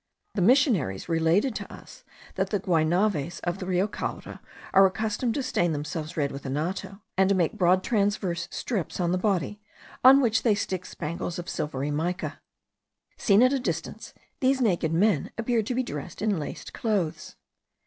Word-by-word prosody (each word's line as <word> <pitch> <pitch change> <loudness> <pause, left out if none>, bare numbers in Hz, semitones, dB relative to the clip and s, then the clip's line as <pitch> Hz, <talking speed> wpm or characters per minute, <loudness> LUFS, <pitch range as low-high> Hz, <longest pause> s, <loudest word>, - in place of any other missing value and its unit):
The 200 - -1
missionaries 200 - +3
related 165 +9 +2
to - - -8
us - - -13 0.3
that - - -1
the 205 - 0
Guaynaves 175 -1 +1
of 175 +2 -2
the 185 - -5
Rio 185 +2 +1
Caura - - -6 0.3
are 195 0 +7
accustomed 220 +4 -2
to 280 - -1
stain 175 -10 +1
themselves 155 +2 -5
red 145 -2 0
with 140 - -7
anato, 185 +8 -3 0.2
and 190 0 +5
to 200 - +3
make 175 -4 +1
broad 185 -2 +3
transverse 200 -5 0
stripes 200 -9 -3
on 175 -1 +1
the 180 - +1
body, 200 0 -1 0.4
on 265 +2 +9
which 235 -3 +2
they 220 -4 +3
stick 185 -2 -3
spangles 165 +2 -4
of 175 0 -6
silvery 145 -4 -3
mica. 170 +5 -3 0.8
Seen 205 +2 +4
at 255 +2 +4
a 275 - +1
distance, 255 - -4 0.2
these 265 0 +2
naked 180 -9 +1
men 175 -2 +2
appear 230 0 +1
to 230 +4 -3
be 255 - +1
dressed 170 - -6
in 205 -5 +1
laced 145 - -7
clothes. 175 -8 -2
185 Hz, 170 wpm, -26 LUFS, 165-215 Hz, 0.8 s, on